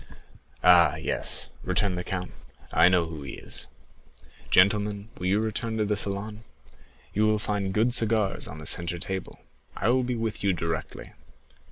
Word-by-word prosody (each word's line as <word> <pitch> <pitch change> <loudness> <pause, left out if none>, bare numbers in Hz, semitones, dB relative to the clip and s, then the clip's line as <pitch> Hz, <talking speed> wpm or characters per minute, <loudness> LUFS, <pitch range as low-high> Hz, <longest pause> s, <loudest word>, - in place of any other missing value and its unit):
"Ah! 85 -4 +7
yes," - - -3
returned 90 +1 0
the 90 - -3
count, 90 -1 -4 0.4
"I 85 - +6
know 90 -2 +3
who 80 -2 -7
he 70 -1 -7
is, - - -6 0.8
gentlemen; 100 +2 +3
will 90 - -2
you 100 +3 +3
return 110 +1 -2
to 110 - +1
the 105 0 0
salon? 105 +2 -4 0.7
you 110 +2 +3
will 110 0 +3
find 105 -2 -2
good 110 +5 +2
cigars 110 -4 +2
on 75 - -8
the 75 - -9
centre 85 +1 +1
table. 95 +1 -4 0.4
I 100 - +1
will 130 +1 +3
be 125 0 -2
with 110 -2 -3
you 100 -1 +3
directly." 85 -2 -4
100 Hz, 165 wpm, -27 LUFS, 90-110 Hz, 0.8 s, Ah